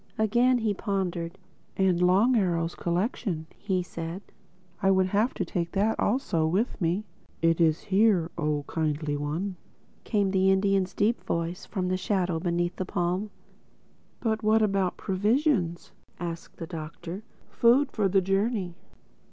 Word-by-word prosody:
Again 240 +4 +3
he 220 -3 0
pondered. 185 -4 -2 0.4
"And 185 -2 +2
Long 195 +8 +4
Arrow's 170 -5 +1
collection," 175 - -2
he 185 -3 -1
said. 170 +2 -6 0.6
"I 195 - +3
would 190 -1 +4
have 210 +6 +1
to 185 - -1
take 170 0 -3
that 210 +3 +1
also 205 - +1
with 195 +9 -1
me." 175 +5 +1 0.4
"It 165 0 +3
is 160 -1 +3
here, 195 -4 +3
Oh 150 -3 -1
Kindly 150 -2 -1
One," 160 +7 -3 0.5
came 200 -3 +1
the 190 0 +3
Indian's 195 -1 +2
deep 225 +4 +1
voice 170 +1 -3
from 180 -2 -2
the 185 - +1
shadow 185 -3 0
beneath 175 0 -1
the - - -1
palm. 180 +3 -1 0.9
"But 220 -2 -1
what 220 +1 +4
about 195 -3 +1
provisions," 200 - 0 0.3
asked 170 -1 -6
the 165 - -5
Doctor—"food 190 - -1
for 210 -3 +1
the 195 +1 +3
journey?" 195 0 0
185 Hz, 140 wpm, -27 LUFS, 170-210 Hz, 0.9 s, Long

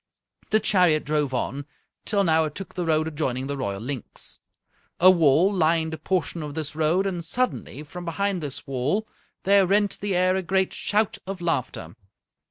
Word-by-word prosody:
The 215 - +4
chariot 180 -8 +3
drove 150 -2 0
on, 135 +2 -3 0.4
till 200 -1 +1
now 160 -3 +3
it 150 - -6
took 195 - -7
the 175 -2 -3
road 155 0 +2
adjoining 135 -5 -2
the 140 +1 -3
royal 100 -8 -3
Linx. 125 -1 -7 0.6
A 185 +2 +8
wall 170 +3 +4
lined 160 -2 +1
a 160 - -6
portion 170 0 -1
of 150 -1 -6
this 155 -2 -4
road, 160 +5 +2
and 180 -3 -2
suddenly, 165 - -2
from 175 +4 -9
behind 190 +2 -1
this 145 -3 -6
wall, 140 - -1 0.4
there 195 -1 +4
rent 205 +1 +1
the 200 -2 -1
air 185 +1 +3
a 190 - 0
great 190 +1 0
shout 210 0 0
of 195 -1 -5
laughter. 130 - -2
165 Hz, 180 wpm, -25 LUFS, 150-190 Hz, 0.6 s, A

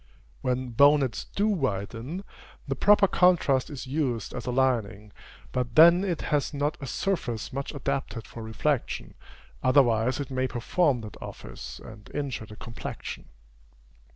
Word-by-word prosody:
When 125 0 -1
bonnets 140 0 +4
do 205 +2 +2
widen, 130 - -2 0.4
the 135 - 0
proper 205 +6 +5
contrast 170 -9 +3
is 140 -3 -6
used 130 -5 -2
as 125 0 -6
a - - 0
lining; 115 -5 0 0.4
but 125 -2 -2
then 170 +3 +8
it 180 -5 -2
has 145 0 +1
not 145 +2 0
a 135 - -5
surface 125 - -2
much 140 +1 -3
adapted 140 -4 -3
for 115 - -9
reflection, 115 +5 -2 0.5
otherwise 130 -2 +3
it 140 -2 -4
may 130 0 0
perform 130 +2 +1
that 105 -1 -10
office, - - -8
and 110 -2 -12
injure 135 -6 -3
the 105 - -11
complexion. 115 +1 -7
130 Hz, 140 wpm, -27 LUFS, 115-145 Hz, 0.5 s, then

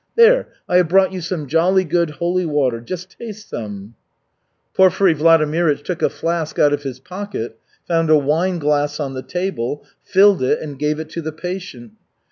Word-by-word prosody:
There, 470 +2 +5 0.2
I 180 - +3
have 180 -2 +4
brought 190 +1 +4
you 185 - -4
some 165 -2 -4
jolly 175 +6 +2
good 170 -1 0
holy 175 +4 -1
water, 135 -6 0
just 180 +8 -7
taste 215 -2 -9
some." 105 -1 -7 0.8
Porfiry 190 -1 +4
Vladimirych 155 -1 +2
took 180 +1 -4
a - - +3
flask 165 -2 -3
out 145 -1 +4
of 145 - -1
his 135 -3 -6
pocket, 180 - -6 0.3
found 165 -2 +1
a 155 - +7
wine 160 +6 0
glass 145 -1 0
on 140 -3 -3
the 130 - -5
table, 150 -6 -3 0.2
filled 195 +3 +4
it 130 - +1
and 145 -3 -8
gave 150 +1 0
it 160 -1 -6
to 170 - -4
the 160 0 -4
patient. 155 - -7
165 Hz, 180 wpm, -19 LUFS, 145-185 Hz, 0.8 s, a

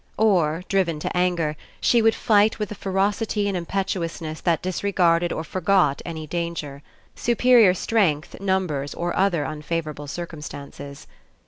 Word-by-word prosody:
Or, 180 -6 +2
driven 185 -6 +1
to - - -3
anger, 175 -4 +1 0.2
she 235 - +3
would 225 0 +4
fight 210 0 +3
with 210 -2 -4
a - - -2
ferocity 205 +2 -1
and 200 - -1
impetuousness 170 -3 -3
that 170 -1 +1
disregarded 180 -2 +1
or 160 - -3
forgot 180 -3 +1
any 160 -2 -6
danger; 160 -4 -4 0.3
superior 235 -5 +4
strength, 180 -7 0
numbers, 180 -8 -1
or 175 0 -2
other 185 -6 +2
unfavourable 150 0 -4
cir 175 +5 -4
cumstances. 140 -3 -9
175 Hz, 135 wpm, -23 LUFS, 155-195 Hz, 0.3 s, would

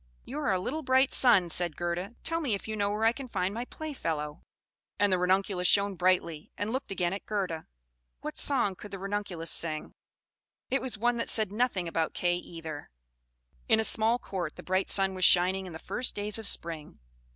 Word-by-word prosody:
"You 275 +5 -5
are 290 -7 0
a 185 - +1
little 280 +12 -3
bright 260 -1 +3
sun!" 190 -9 +5
said 175 -3 0
Gerda. 175 +5 -3
"Tell 330 0 0
me 255 -9 0
if 200 - -8
you 220 - -3
know 200 -1 0
where 210 +2 -1
I 225 - +6
can 265 +2 -8
find 190 -4 -2
my 235 +3 -4
playfellow." 165 - -5 0.6
And 205 -1 +3
the 185 - +2
Ranunculus 185 0 +1
shone 200 +1 +3
brightly, 175 -4 0
and 210 +3 -3
looked 260 - -3
again 180 -2 -1
at 200 - -7
Gerda. 185 -6 -3 0.5
What 305 0 -5
song 250 -9 +4
could 205 +3 -11
the 195 - -6
Ranunculus 195 -4 -3
sing? 155 -2 0 0.8
It 270 - +1
was 255 -4 -4
one 240 +2 +1
that 230 - -2
said 215 -3 +3
nothing 210 -5 0
about 165 -1 -2
Kay 175 0 +1
either. 160 -4 -8 0.8
"In - - +5
a - - +2
small 225 +2 +4
court 180 -9 -5
the - - -10
bright 185 +1 0
sun 195 -1 +4
was 185 -1 -3
shining 185 +2 +5
in 175 - -9
the - - -6
first 250 +9 -1
days 210 +1 +1
of 220 - -2
spring. 165 -5 -1
195 Hz, 205 wpm, -29 LUFS, 175-225 Hz, 0.8 s, I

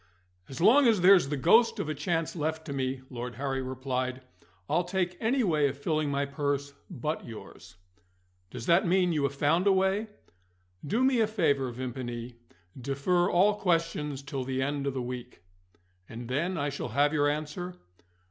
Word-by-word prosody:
"As 135 - -7
long 245 +10 +6
as 220 -5 +3
there's 180 -5 +6
the 145 - -1
ghost 225 - +4
of - - -3
a 155 - -1
chance 165 +3 -2
left 160 0 -3
to 145 - -5
me," 130 -1 -2
Lord 120 0 -6
Harry 135 0 -2
replied, 130 0 -3 0.5
"I'll 170 +4 +1
take 180 0 -2
any 245 +3 +1
way 155 -7 +2
of 135 - -7
filling 155 0 -1
my 140 0 0
purse 140 0 -2 0.2
but 155 -2 -3
yours." 95 -5 -11 0.7
"Does 125 -2 -7
that 170 +2 +4
mean 180 -1 +3
you 150 - 0
have 140 0 -2
found 165 +7 +2
a - - +6
way?" 190 +3 +1 0.8
"Do 225 - 0
me 260 -2 +3
a 220 - +3
favour, 145 - +1
Vimpany. 120 -1 -5 0.4
Defer 140 +8 0
all 205 +4 +3
questions 165 -6 -1
till 140 -1 -4
the 130 0 -3
end 140 0 -2
of 135 - -2
the 130 - -2
week." 125 -5 -7 0.7
"And 115 +1 -8
then 170 +8 -1
I 145 -1 -1
shall 140 -3 -5
have 145 +5 +2
your 145 -1 +3
answer?" 155 +5 -4
145 Hz, 175 wpm, -28 LUFS, 130-175 Hz, 0.8 s, long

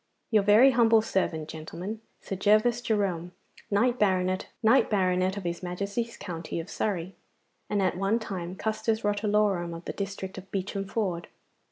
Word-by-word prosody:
'Your 215 -2 +5
very 215 +7 +6
humble 225 -2 +5
servant, 160 -7 -1
gentlemen, 175 +7 -6 0.2
Sir 195 - -4
Gervas 215 +5 +3
Jerome, 190 -6 -1 0.4
knight 240 +5 +2
banneret 185 -2 +1 0.9
of 200 - -5
his 170 0 -3
Majesty's 200 +6 -3
county 170 -2 -5
of 165 - -7
Surrey, 190 -3 -2 0.6
and 205 -2 +1
at 180 -1 +1
one 195 +4 +2
time 185 -5 -5
custos 220 +1 -1
rotulorum 205 -4 +1
of 165 - -10
the - - -4
district 195 -1 -5
of 190 +1 -14
Beacham 195 +1 -3
Ford. 190 -5 -2
195 Hz, 145 wpm, -28 LUFS, 180-215 Hz, 0.9 s, very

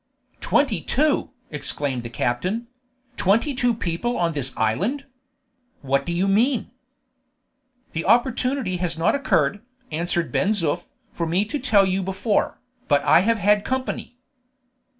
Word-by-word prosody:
"Twenty 270 -7 +1
two!" 300 +3 +1 0.2
exclaimed 140 -3 -2
the 120 - -7
captain; 180 - -2 0.5
"twenty 230 +9 +2
two 245 -2 +1
people 220 +5 -2
on 170 -1 +1
this 140 -4 -1
island? 195 - 0 0.8
What 140 +2 0
do - - -1
you 180 +3 +1
mean?" 230 +6 +1 1.2
"The 165 - -3
opportunity 250 -4 +1
has 175 -2 -2
not 165 - +2
occurred," 200 - +1 0.3
answered 170 +1 -1
Ben 205 +3 +2
Zoof, 165 -8 -1 0.2
"for 170 - -3
me 180 +5 +1
to 290 +7 -3
tell 215 -7 +4
you 190 +1 0
before, 195 +3 -1 0.3
but 145 -1 +3
I - - +6
have 225 +5 +2
had 205 0 +3
company." 260 -1 -3
195 Hz, 135 wpm, -23 LUFS, 165-240 Hz, 1.2 s, I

